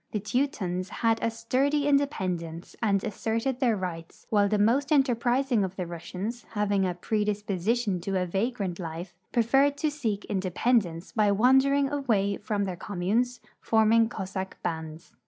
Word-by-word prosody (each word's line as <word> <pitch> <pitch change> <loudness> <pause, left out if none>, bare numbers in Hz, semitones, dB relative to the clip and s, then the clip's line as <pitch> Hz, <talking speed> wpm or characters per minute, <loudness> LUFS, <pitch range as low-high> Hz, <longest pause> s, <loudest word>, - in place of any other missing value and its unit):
The 210 - 0
Teutons 200 -5 -1
had 225 0 0
a - - +1
sturdy 265 +6 0
independence 185 - -1
and 200 -3 +2
asserted 225 +5 -2
their 235 -5 +2
rights, 170 -3 -6
while 205 -2 +4
the 210 - +2
most 250 +8 +2
enterprising 250 -3 +2
of 190 0 -4
the 185 - -3
Russians, 185 +7 -6
having 205 -2 +1
a 180 - -2
i)redisi>osition 210 0 -1
to 190 +1 -1
a 180 - 0
vagrant 195 -1 -2
life, 170 +1 -6 0.2
preferred 270 +4 +3
to 305 +1 0
seek 225 -9 -3
independence 190 -2 0
l)y 210 -2 +3
wandering 265 +6 +4
away 215 -9 +1
from 205 -2 -2
tlieir 180 -2 -5
communes, 210 +7 -1 0.2
forming 225 0 +3
Cossack 190 -2 -5
bands. 160 -1 -5
210 Hz, 145 wpm, -27 LUFS, 185-245 Hz, 0.2 s, while